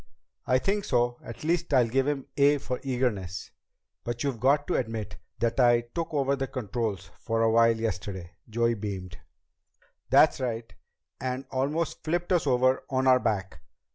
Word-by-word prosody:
"I -, -, +4 dB
think 205 Hz, +1 st, 0 dB
so. 120 Hz, -4 st, +1 dB
At 115 Hz, -, -9 dB
least, 170 Hz, -2 st, +1 dB
I 125 Hz, -, +6 dB
give 130 Hz, +4 st, +1 dB
him 145 Hz, -3 st, -1 dB
'A' 145 Hz, +1 st, +5 dB
for 130 Hz, -2 st, -4 dB
eagerness." 120 Hz, -9 st, -2 dB, 0.5 s
"But 120 Hz, 0 st, -3 dB
you've 135 Hz, -5 st, -2 dB
got 140 Hz, +4 st, +3 dB
to 180 Hz, -, -1 dB
admit 110 Hz, -4 st, -3 dB, 0.2 s
that 115 Hz, +3 st, 0 dB
I 120 Hz, -1 st, +5 dB
took 170 Hz, -1 st, -3 dB
over 140 Hz, -2 st, +1 dB
the 135 Hz, -1 st, -3 dB
controls 115 Hz, -5 st, -3 dB
for 115 Hz, 0 st, 0 dB
a 115 Hz, -, +3 dB
while 115 Hz, 0 st, +4 dB
yesterday." 95 Hz, -5 st, -4 dB, 0.2 s
Joey 115 Hz, +1 st, +1 dB
beamed. 95 Hz, -4 st, -6 dB, 0.9 s
"That's -, -, +5 dB
right. 115 Hz, -3 st, -3 dB, 0.5 s
And 130 Hz, +2 st, -3 dB
almost 145 Hz, +5 st, -1 dB
flipped 175 Hz, +3 st, -1 dB
us 170 Hz, -4 st, +2 dB
over 130 Hz, 0 st, +3 dB
on 130 Hz, -1 st, 0 dB
our 130 Hz, -1 st, +6 dB
back. 95 Hz, -9 st, -2 dB
125 Hz, 165 wpm, -27 LUFS, 115-140 Hz, 0.9 s, I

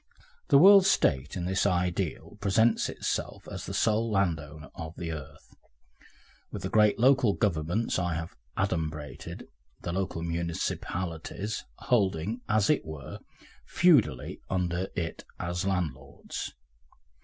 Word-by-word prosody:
The -, -, +6 dB
World 195 Hz, +4 st, +8 dB
State 70 Hz, -, +2 dB
in 90 Hz, -, -3 dB
this 95 Hz, +2 st, +1 dB
ideal 90 Hz, -2 st, -1 dB
presents 110 Hz, +3 st, +3 dB
itself -, -, -3 dB
as -, -, -6 dB
the -, -, -4 dB
sole 110 Hz, +1 st, +2 dB
landowner 80 Hz, -6 st, -1 dB
of 80 Hz, 0 st, -7 dB
the 85 Hz, -1 st, -4 dB
earth, 75 Hz, -4 st, -9 dB, 1.0 s
with -, -, -6 dB
the -, -, -2 dB
great 105 Hz, -1 st, +4 dB
local 130 Hz, -3 st, +4 dB
governments 90 Hz, +2 st, 0 dB
I 85 Hz, -2 st, -1 dB
have 85 Hz, +1 st, -5 dB, 0.2 s
adumbrated, 80 Hz, -6 st, -3 dB, 0.4 s
the 85 Hz, -, -3 dB
local 95 Hz, -3 st, -2 dB
municipalities, 85 Hz, +3 st, -3 dB
holding, 105 Hz, 0 st, 0 dB
as 105 Hz, -1 st, +3 dB
it 150 Hz, -, +2 dB
were, 80 Hz, -4 st, -8 dB, 0.4 s
feudally 145 Hz, -, +3 dB
under 90 Hz, 0 st, -1 dB
it 85 Hz, -4 st, -3 dB, 0.2 s
as 90 Hz, +2 st, -2 dB
landlords. 75 Hz, -8 st, -3 dB
90 Hz, 120 wpm, -29 LUFS, 80-105 Hz, 1.0 s, World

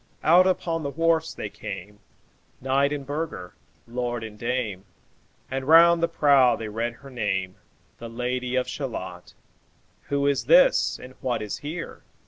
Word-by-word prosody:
Out 180 Hz, +4 st, +6 dB
upon 170 Hz, -3 st, -1 dB
the 140 Hz, -, -3 dB
wharfs 165 Hz, +1 st, +1 dB
they -, -, -5 dB
came, 105 Hz, 0 st, -8 dB, 0.6 s
Knight 135 Hz, +2 st, +1 dB
and 145 Hz, -2 st, -4 dB
burgher, 145 Hz, -, -5 dB, 0.3 s
lord 120 Hz, -1 st, -3 dB
and 110 Hz, -1 st, -8 dB
dame, 115 Hz, -4 st, -3 dB, 0.7 s
And 135 Hz, 0 st, -3 dB
round 170 Hz, +1 st, +7 dB
the 170 Hz, -, +3 dB
prow 140 Hz, -6 st, +4 dB
they 110 Hz, -1 st, -6 dB
read 115 Hz, +3 st, -2 dB
her 135 Hz, +3 st, -14 dB
name, 95 Hz, -6 st, -2 dB, 0.4 s
'The 115 Hz, -, -7 dB
Lady 125 Hz, +2 st, -3 dB
of 130 Hz, -1 st, 0 dB
Shalott' -, -, -6 dB, 0.7 s
"Who 140 Hz, 0 st, -1 dB
is 140 Hz, -1 st, +1 dB
this? -, -, +5 dB
and 130 Hz, -, -11 dB
what 125 Hz, -4 st, -1 dB
is 105 Hz, -1 st, -5 dB
here? 160 Hz, +4 st, -6 dB
130 Hz, 150 wpm, -25 LUFS, 115-160 Hz, 0.7 s, round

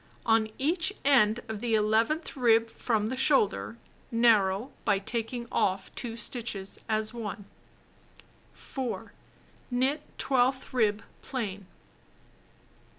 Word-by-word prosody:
On 225 Hz, -1 st, +3 dB
each 335 Hz, +7 st, +1 dB
end 240 Hz, -5 st, +4 dB
of 220 Hz, -2 st, -4 dB
the 230 Hz, 0 st, +1 dB
eleventh 225 Hz, +9 st, +1 dB
rib 230 Hz, -3 st, +3 dB
from 220 Hz, -3 st, 0 dB
the 260 Hz, -, -2 dB
shoulder, 200 Hz, -, +2 dB, 0.3 s
narrow 225 Hz, -1 st, +3 dB
by 205 Hz, -3 st, +3 dB
taking 235 Hz, +4 st, -3 dB
off 190 Hz, 0 st, 0 dB
2 230 Hz, -2 st, -4 dB
stitches 220 Hz, -5 st, -4 dB
as 215 Hz, 0 st, +1 dB
1. 210 Hz, -3 st, -6 dB, 1.1 s
4. 260 Hz, -4 st, -5 dB, 0.6 s
Knit 260 Hz, +4 st, +1 dB, 0.2 s
twelfth 260 Hz, 0 st, +1 dB
rib 215 Hz, -4 st, +2 dB, 0.2 s
plain. 200 Hz, -7 st, -4 dB
230 Hz, 105 wpm, -29 LUFS, 210-255 Hz, 1.1 s, end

